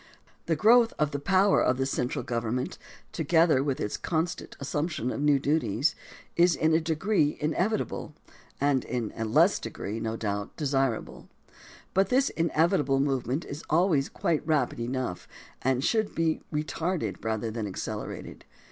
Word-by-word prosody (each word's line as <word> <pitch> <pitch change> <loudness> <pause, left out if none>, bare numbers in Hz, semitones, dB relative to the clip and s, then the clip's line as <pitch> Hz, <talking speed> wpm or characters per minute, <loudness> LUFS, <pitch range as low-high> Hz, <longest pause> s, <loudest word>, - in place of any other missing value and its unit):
The 165 - +2
growth 230 +6 +5
of 150 -1 +1
the 145 - -3
power 190 +6 +3
of 125 - +2
the 135 - 0
central 130 0 -2
government, 120 +1 -2 0.3
together 165 -5 +3
with 140 -2 -1
its 105 - -2
constant 165 0 -3
assumption 145 -2 -2
of - - -4
new 145 -1 +4
duties, 145 -1 +1 0.4
is 175 0 +4
in 160 0 +2
a 160 - +4
degree 160 0 +1
inevitable 165 0 -1 0.4
and, 140 -2 +2
in 120 -4 -3
a 115 - -2
less 110 - +4
degree, 110 +3 -5
no 110 0 -3
doubt, 100 -2 -3
desirable. 135 -5 -1 0.6
But 195 0 +3
this 265 +2 +3
in 165 0 0
evitable 155 -4 +2
movement 135 +1 0
is 145 +2 -7
always 160 -4 +3
quite 160 -3 0
rapid 150 -7 0
enough 125 -5 -3 0.3
and 130 0 +1
should 220 +3 +1
be 165 -1 +1
retarded 155 - -2
rather 110 0 -2
than 110 -2 -3
accelerated. 95 - -6
145 Hz, 150 wpm, -28 LUFS, 125-165 Hz, 0.6 s, growth